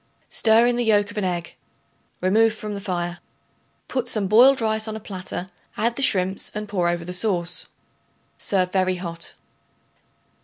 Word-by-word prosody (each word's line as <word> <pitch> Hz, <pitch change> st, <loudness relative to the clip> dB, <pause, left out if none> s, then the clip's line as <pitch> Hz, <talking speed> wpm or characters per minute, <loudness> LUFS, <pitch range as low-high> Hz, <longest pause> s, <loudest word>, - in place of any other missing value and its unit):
Stir 225 Hz, +1 st, +5 dB
in 240 Hz, 0 st, +2 dB
the 245 Hz, -, +1 dB
yolk 205 Hz, -2 st, +2 dB
of 215 Hz, -, -11 dB
an -, -, -2 dB
egg. 175 Hz, -2 st, -3 dB, 0.7 s
Remove 220 Hz, +4 st, +3 dB
from 215 Hz, -1 st, -5 dB
the 200 Hz, -, -5 dB
fire. 175 Hz, -3 st, -3 dB, 0.7 s
Put 255 Hz, -2 st, -2 dB
some 215 Hz, -4 st, 0 dB
boiled 245 Hz, +7 st, +6 dB
rice 220 Hz, -1 st, 0 dB
on 220 Hz, -, -4 dB
a -, -, -5 dB
platter; 185 Hz, -2 st, -6 dB, 0.3 s
add 235 Hz, +1 st, +1 dB
the -, -, -4 dB
shrimps 190 Hz, -6 st, +1 dB
and 210 Hz, 0 st, -4 dB
pour 180 Hz, -4 st, 0 dB
over 170 Hz, -1 st, -2 dB
the 180 Hz, -, -5 dB
sauce. 180 Hz, -3 st, -1 dB, 0.7 s
Serve 185 Hz, -2 st, 0 dB
very 185 Hz, -1 st, +1 dB
hot. 170 Hz, -2 st, -6 dB
200 Hz, 165 wpm, -23 LUFS, 180-220 Hz, 0.7 s, boiled